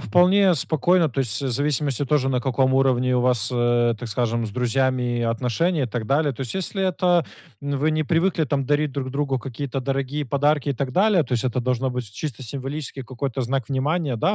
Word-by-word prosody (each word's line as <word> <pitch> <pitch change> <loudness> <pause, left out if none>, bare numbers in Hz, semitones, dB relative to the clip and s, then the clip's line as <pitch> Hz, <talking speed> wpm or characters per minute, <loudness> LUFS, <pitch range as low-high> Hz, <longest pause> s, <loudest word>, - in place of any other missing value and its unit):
вполне 185 +1 +4
спокойно. 165 +3 +2
То 135 0 -2
есть 115 -2 -2
в 135 - -1
зависимости 145 +1 0
тоже 140 -1 +1
на 130 -2 +1
каком 130 +1 +1
уровне 130 -1 +2
у - - +2
вас, 125 -4 +1
э, 120 -1 +2
так 120 - -6
скажем, 115 +1 -1
с 110 - -4
друзьями 125 +1 0
отношения 125 - 0
и - - -2
так 115 -1 -4
далее. 145 +2 +2
То 130 - -12
есть 130 -3 -4
если 190 +1 -2
это 180 -2 +2 0.4
м, 145 -1 -2
вы 150 +3 +2
не 155 0 +1
привыкли 165 +2 +1
там 140 -1 -1
дарить 150 +1 +1
друг 130 -1 -4
другу 140 -1 -1
какие-то 135 +2 -5
дорогие 135 +2 -2
подарки 145 +2 +1
и - - +2
так 135 0 -3
далее, 195 -1 +4
то 125 - -7
есть 120 -1 0
это 125 0 0
должно 130 +1 0
быть 125 -4 -5
чисто 135 0 -5
символический 135 +3 -6
какой-то 130 +1 -4
знак 130 -1 -1
внимания. 140 0 0
Да, 195 - +1
135 Hz, 210 wpm, -23 LUFS, 125-150 Hz, 0.4 s, вполне